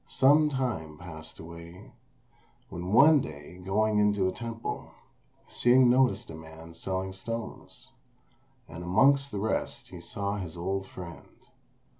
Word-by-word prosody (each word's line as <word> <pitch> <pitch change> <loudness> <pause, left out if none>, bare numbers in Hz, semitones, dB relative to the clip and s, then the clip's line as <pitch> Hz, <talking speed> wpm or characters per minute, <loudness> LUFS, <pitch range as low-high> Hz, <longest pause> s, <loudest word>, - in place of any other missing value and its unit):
Some 145 +3 +5
time 120 - -3
passed 80 -2 -10
away, 85 +4 -11 0.8
when 90 +2 -5
one 145 +7 +7
day 75 +4 -9
going 105 +3 +2
into 105 -2 +3
a - - 0
temple 115 +3 -5 0.6
Hsing 125 0 +5
noticed 125 -6 +2
a - - -7
man 80 +1 -11
selling 95 +2 -3
stones, 115 +4 -7 0.8
and 85 - -8
amongst 135 +10 +4
the 105 - -4
rest 110 +3 -2
he 90 -2 -9
saw 100 +3 -3
his 90 -4 -6
old 95 +2 -2
friend. 90 -3 -10
95 Hz, 130 wpm, -29 LUFS, 85-115 Hz, 0.8 s, one